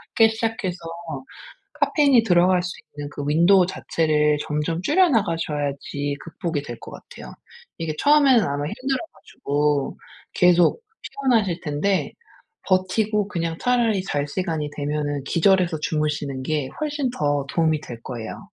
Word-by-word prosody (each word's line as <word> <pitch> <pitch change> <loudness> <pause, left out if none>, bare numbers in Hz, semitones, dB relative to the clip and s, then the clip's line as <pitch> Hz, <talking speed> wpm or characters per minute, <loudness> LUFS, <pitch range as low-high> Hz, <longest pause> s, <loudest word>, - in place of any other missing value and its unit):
작게 225 -1 +6
시작해서 220 -6 -2 1.0
카페인이 280 -6 +4
들어갈 180 -2 +3
수 180 - -3 0.3
있는 145 0 -5
그 145 - -5
윈도우 175 +4 +5
자체를 150 -4 +1
점점 150 +3 -2
줄여 355 - +4
나가셔야지 145 - -1
극복이 165 -3 -4
될 120 -4 -8
것 - - -10
같아요. - - -11 0.4
이게 165 -2 -3
처음에는 280 -6 +5
아마 145 +1 -2
힘들어 260 - -2 0.2
가지고 145 -1 -1 0.4
계속 180 - +4 0.2
피곤하실 220 -11 0
텐데 170 +6 -1 0.5
버티고 200 +3 +1
그냥 165 -4 -3
차라리 230 -6 +1
잘 145 -6 -2
시간이 160 -3 -2
되면은 145 -1 -2
기절해서 175 0 +2
주무시는 150 -4 -2
게 150 -2 -1
훨씬 290 -3 -1
더 145 - 0
도움이 160 -2 +1
될 120 -5 -9
거예요. 115 -3 -6
170 Hz, 310 characters per minute, -23 LUFS, 150-205 Hz, 1.0 s, 작게